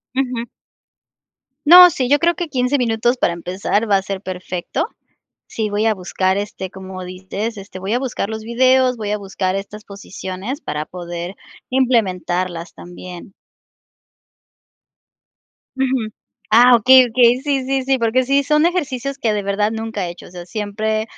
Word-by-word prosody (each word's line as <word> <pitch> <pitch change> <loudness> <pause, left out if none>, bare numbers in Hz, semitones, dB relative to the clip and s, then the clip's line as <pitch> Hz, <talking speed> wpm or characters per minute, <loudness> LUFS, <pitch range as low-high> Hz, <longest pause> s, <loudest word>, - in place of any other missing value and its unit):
Ujú. 255 -3 -1 1.2
No, 360 +3 +10
sí, 255 -4 -2
yo 290 - +5
creo 340 +3 +2
que 350 - -3
15 255 +1 0
minutos 240 +1 +1
para 170 - +1
empezar 185 +5 -2
va 200 - +5
a - - -1
ser 195 0 -5
perfecto, 185 - -4 0.6
sí, 215 -2 -3
voy 205 +2 0
a 220 - +3
buscar, 190 +1 -1
este, 200 -2 -5
como 190 -1 -8
dices, 190 +5 -5
este, 195 -1 -10
voy 195 +4 -3
a 245 - +1
buscar 245 -5 -3
los 220 0 -5
videos, 255 +1 +3
voy 210 -1 -4
a 210 - -1
buscar 190 -1 -2
estas 205 +2 -6
posiciones 200 +5 -7
para 150 +1 -4
poder 175 +1 -7 0.3
implementarlas 185 -9 0
también. 180 +1 -11 2.4
Ujú, 260 -4 0 0.4
ah, 245 +3 +7
okey, 255 +3 +7
okey, 240 +1 +4
sí, 275 -2 -1
sí, 270 0 0
sí, 265 0 +1
porque 235 +2 +1
sí 275 +2 +2
son 300 +2 +3
ejercicios 275 -6 -2
que 225 -5 0
de 210 - -1
verdad 200 +2 0
nunca 225 -4 -4
he - - -4
hecho, 175 - -13
o - - -14
sea, 175 -1 -9
siempre 215 +2 -2
220 Hz, 160 wpm, -19 LUFS, 190-255 Hz, 2.4 s, No